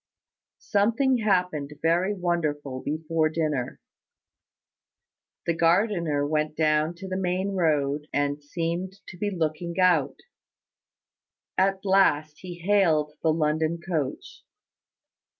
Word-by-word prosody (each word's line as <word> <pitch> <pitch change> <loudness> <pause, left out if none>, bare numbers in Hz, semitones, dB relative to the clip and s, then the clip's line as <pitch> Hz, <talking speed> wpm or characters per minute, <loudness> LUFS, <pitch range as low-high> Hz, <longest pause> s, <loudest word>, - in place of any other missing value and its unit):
Something 230 +5 +1
happened 180 -9 0
very 175 +5 +2
wonderful 150 -7 -2
before 155 +1 0
dinner. 155 -6 -2 1.7
The 170 - +1
gardener 170 -3 +2
went 155 0 -1
down 155 +1 +2
to 190 +3 -8
the 185 - -3
main 185 +1 -1
road, 150 -4 0
and 145 0 -1
seemed 170 +5 -3 0.2
to 175 - -10
be 205 - 0
looking 170 0 -3
out. 175 -7 +3 1.3
At 195 +1 +1
last 155 -6 +3
he 180 -2 -8
hailed 165 -7 +3
the 160 - +3
London 155 +1 0
coach. 170 - -4
165 Hz, 105 wpm, -26 LUFS, 150-185 Hz, 1.7 s, out